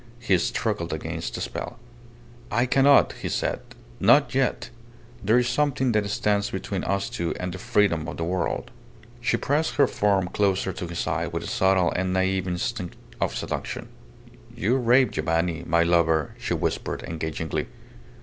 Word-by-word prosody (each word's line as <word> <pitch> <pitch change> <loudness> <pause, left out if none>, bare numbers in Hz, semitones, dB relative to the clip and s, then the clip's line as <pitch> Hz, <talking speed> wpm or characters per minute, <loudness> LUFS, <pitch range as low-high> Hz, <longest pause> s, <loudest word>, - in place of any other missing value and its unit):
He 115 -5 +2
struggled - - -1
against - - -4
the - - -4
spell. 120 - -5 0.7
"I 120 +3 +2
cannot," 135 +2 +5
he - - -3
said. - - -1 0.4
"Not 120 +8 +5
yet. 135 -1 0 0.5
There 110 +4 +4
is 125 0 +2
something 130 0 +1
that 105 -2 +1
stands 100 0 +1
between 95 0 -3
us 100 0 0
two 100 -9 -3
and 90 -1 -3
the 95 - -7
freedom 85 -5 +1
of 85 - -6
the 85 - -2
world." 90 +2 -2 0.5
She 120 - +1
pressed 150 +3 0
her 140 - +5
form 100 -6 +1
closer 95 -2 +1
to 90 - -5
his 85 0 -6
side - - -2
with - - -2
a - - -6
subtle 95 -2 +2
and 95 0 0
naive 95 0 +1
instinct 90 0 -3 0.3
of - - 0
seduction. - - -4 0.7
"You 115 +7 +1
rave, 125 +1 +4
Giovanni 80 +1 -1
my 85 0 +4
lover!" 80 -3 +2
she - - -1
whispered, - - -2
engagingly. 80 +2 -3
95 Hz, 160 wpm, -25 LUFS, 85-120 Hz, 0.7 s, cannot